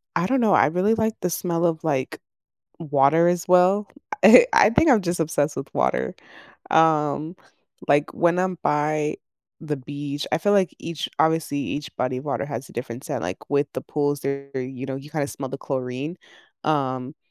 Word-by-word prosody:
I 170 Hz, -, +1 dB
don't 265 Hz, +2 st, +1 dB
know. 215 Hz, -4 st, +3 dB
I -, -, +5 dB
really 180 Hz, +8 st, +1 dB
like 220 Hz, 0 st, 0 dB
the 180 Hz, -, 0 dB
smell 170 Hz, 0 st, -1 dB
of, 165 Hz, -2 st, 0 dB
like, 140 Hz, -5 st, -2 dB, 0.6 s
water 150 Hz, +1 st, +3 dB
as 175 Hz, -1 st, -1 dB
well. 185 Hz, +3 st, +4 dB, 0.3 s
I -, -, +9 dB
I -, -, +6 dB
think 295 Hz, +7 st, +4 dB
I'm 240 Hz, -5 st, +5 dB
just 175 Hz, -2 st, -2 dB
obsessed 150 Hz, -2 st, 0 dB
with 135 Hz, -, -6 dB
water. 65 Hz, +1 st, 0 dB, 0.6 s
Um, 155 Hz, 0 st, +2 dB, 0.5 s
like, 145 Hz, +1 st, +2 dB
when 170 Hz, +1 st, +2 dB
I'm 185 Hz, -1 st, -1 dB
by 150 Hz, 0 st, 0 dB, 0.4 s
the 155 Hz, -2 st, -3 dB
beach, 145 Hz, +1 st, -6 dB
I -, -, +3 dB
feel, 205 Hz, +5 st, +1 dB
like, 190 Hz, -3 st, +2 dB
each 165 Hz, -2 st, -5 dB
obviously, 160 Hz, -2 st, +1 dB
each 145 Hz, +2 st, -5 dB
body 125 Hz, 0 st, -1 dB
of 130 Hz, -, -8 dB
water 140 Hz, -1 st, -2 dB
has 135 Hz, -2 st, -6 dB
a -, -, -15 dB
different 120 Hz, +1 st, -6 dB
scent, -, -, -4 dB
like, 90 Hz, +2 st, -6 dB
with 145 Hz, 0 st, +1 dB
the -, -, -4 dB
pools 145 Hz, -1 st, -2 dB
are, 140 Hz, 0 st, -3 dB
you 130 Hz, 0 st, -5 dB
know, 135 Hz, -, -4 dB
you 135 Hz, +2 st, -9 dB
kinda 150 Hz, -2 st, -2 dB
smell 135 Hz, -2 st, -6 dB
the 135 Hz, -, -6 dB
chlorine. 135 Hz, +5 st, -4 dB, 0.5 s
Um, 135 Hz, -2 st, -1 dB
150 Hz, 185 wpm, -23 LUFS, 140-170 Hz, 0.6 s, I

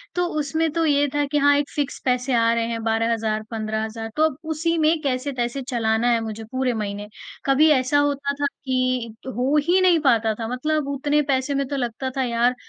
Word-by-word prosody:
तो 355 Hz, -, +1 dB
उसमें 315 Hz, +3 st, 0 dB
तो 330 Hz, 0 st, +1 dB
ये 290 Hz, -1 st, +3 dB
था 290 Hz, -, +2 dB
कि 295 Hz, -, +2 dB
हाँ 285 Hz, 0 st, +5 dB
एक 285 Hz, 0 st, -1 dB
फिक्स 285 Hz, -2 st, -2 dB
पैसे 250 Hz, +1 st, +1 dB
आ 230 Hz, -1 st, +3 dB
रहे 230 Hz, -1 st, 0 dB
हैं 230 Hz, -1 st, -4 dB
12,000 225 Hz, -1 st, 0 dB
15,000 220 Hz, 0 st, -3 dB
तो 310 Hz, -, +4 dB
अब 285 Hz, -, -11 dB, 0.2 s
उसी 330 Hz, +2 st, 0 dB
में 315 Hz, +1 st, +3 dB
कैसे-तैसे 255 Hz, -2 st, -2 dB
चलाना 235 Hz, -3 st, 0 dB
है 235 Hz, -, +3 dB
मुझे 220 Hz, 0 st, -6 dB
पूरे 260 Hz, -1 st, 0 dB
महीने। 205 Hz, -2 st, -4 dB, 0.4 s
कभी 275 Hz, +3 st, +4 dB
ऐसा 280 Hz, +1 st, +3 dB
होता 280 Hz, -1 st, 0 dB
था -, -, +2 dB, 0.2 s
कि 255 Hz, -3 st, -1 dB
हो 260 Hz, +4 st, 0 dB
ही 360 Hz, +2 st, +4 dB
नहीं 355 Hz, -3 st, +5 dB
पाता 230 Hz, -6 st, +3 dB
था 225 Hz, -, -3 dB
मतलब 285 Hz, +4 st, -1 dB
उतने 290 Hz, +2 st, +1 dB
पैसे 275 Hz, 0 st, 0 dB
में 275 Hz, -1 st, 0 dB
तो 285 Hz, -, -3 dB
लगता 255 Hz, 0 st, -3 dB
था 265 Hz, -, +2 dB
यार 240 Hz, +1 st, +1 dB
260 Hz, 205 wpm, -23 LUFS, 230-290 Hz, 0.4 s, हाँ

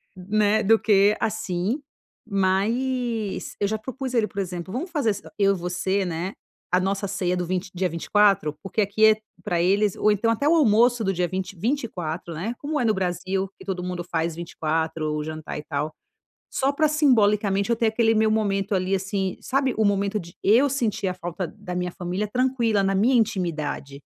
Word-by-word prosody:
né, 210 Hz, +3 st, +1 dB
do 225 Hz, +2 st, +5 dB
que 205 Hz, 0 st, +4 dB
assim.", 215 Hz, -, -1 dB, 0.5 s
mas 220 Hz, +3 st, 0 dB
eu 200 Hz, -, +1 dB
já 220 Hz, -, -1 dB
propus 260 Hz, +3 st, -6 dB
a 245 Hz, -, +1 dB
ele, 215 Hz, -, +3 dB
por 200 Hz, -, -7 dB
exemplo: 180 Hz, -1 st, -4 dB
"Vamos 340 Hz, +9 st, -4 dB
fazer 285 Hz, -8 st, +1 dB
s 205 Hz, -, -5 dB, 0.2 s
eu 200 Hz, 0 st, +4 dB
e -, -, -5 dB
você, 185 Hz, +3 st, -1 dB
né, 175 Hz, +2 st, -3 dB, 0.4 s
a 180 Hz, -, +4 dB
nossa 195 Hz, +1 st, -1 dB
ceia 185 Hz, -2 st, -1 dB
do 180 Hz, -, -1 dB
vint 185 Hz, +1 st, -2 dB
dia 185 Hz, +1 st, 0 dB
24 175 Hz, -1 st, +2 dB
porque 195 Hz, +3 st, -1 dB
aqui 205 Hz, +2 st, +3 dB
é, 220 Hz, 0 st, +7 dB, 0.3 s
pra 175 Hz, -5 st, -1 dB
eles 200 Hz, +3 st, +2 dB
ou 215 Hz, -, +3 dB
então 210 Hz, +3 st, +1 dB
até 230 Hz, +6 st, +1 dB
o -, -, +5 dB
almoço 240 Hz, -4 st, +4 dB
do 195 Hz, -2 st, +1 dB
dia 180 Hz, 0 st, 0 dB
vint 190 Hz, 0 st, -4 dB
24, 180 Hz, -, -3 dB
né, 205 Hz, +9 st, -3 dB
como 300 Hz, +1 st, -2 dB
é -, -, +1 dB
no 220 Hz, -, +3 dB
Brasil 190 Hz, 0 st, -2 dB
que -, -, -12 dB
todo 190 Hz, -2 st, -3 dB
mundo 180 Hz, -1 st, -4 dB
faz 165 Hz, -1 st, -2 dB
24 160 Hz, -2 st, -2 dB
o 150 Hz, -, -2 dB
jantar 155 Hz, -1 st, -6 dB
e 150 Hz, -, -6 dB
tal, 150 Hz, +1 st, -3 dB, 0.6 s
só 270 Hz, +1 st, +1 dB
pra 310 Hz, +2 st, +3 dB
simbolicamente 210 Hz, -9 st, +3 dB
eu 235 Hz, -, +4 dB
ter 230 Hz, -, +2 dB
aquele 225 Hz, 0 st, +3 dB
meu 220 Hz, 0 st, +3 dB
momento 200 Hz, -2 st, 0 dB
ali, 185 Hz, +1 st, 0 dB
assim, 195 Hz, -1 st, -1 dB
sabe, 265 Hz, -2 st, 0 dB
o 220 Hz, -, +3 dB
momento 200 Hz, +1 st, +1 dB
de 170 Hz, -1 st, -11 dB
eu 245 Hz, +8 st, +5 dB
sentir 230 Hz, -7 st, -1 dB
a 185 Hz, -, 0 dB
falta 175 Hz, 0 st, -4 dB
da 195 Hz, -3 st, -7 dB
minha 180 Hz, 0 st, -2 dB
família 180 Hz, +4 st, -3 dB
tranquila, 240 Hz, -5 st, +1 dB
na 195 Hz, 0 st, +1 dB
minha 225 Hz, +7 st, +3 dB
intimidade. 155 Hz, -, -1 dB
195 Hz, 195 wpm, -24 LUFS, 180-220 Hz, 0.6 s, é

